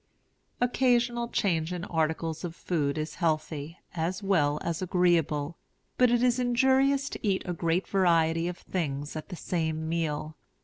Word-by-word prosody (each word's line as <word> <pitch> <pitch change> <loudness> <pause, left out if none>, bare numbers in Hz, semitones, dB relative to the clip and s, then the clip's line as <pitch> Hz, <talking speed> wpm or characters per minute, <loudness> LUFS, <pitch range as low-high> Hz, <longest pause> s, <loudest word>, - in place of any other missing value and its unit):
Occasional 240 -1 +2
change 170 -7 0
in 180 -1 -4
articles 160 0 -1
of 170 -2 -5
food 150 -6 -1
is 155 0 -3
healthy, 155 0 -1 0.2
as 175 +4 -2
well 150 -7 +2
as 170 0 -2
agreeable; 170 -4 +1 0.4
but 250 -1 +6
it 240 0 +2
is 250 0 +3
injurious 265 +3 +3
to - - -6
eat 195 -3 +1
a 180 - -2
great 170 +2 0
variety 165 -3 +2
of 180 0 -4
things 145 -5 -3
at 155 - -6
the 180 - -5
same 160 -2 -2
meal. 155 -2 -2
170 Hz, 150 wpm, -28 LUFS, 160-200 Hz, 0.4 s, but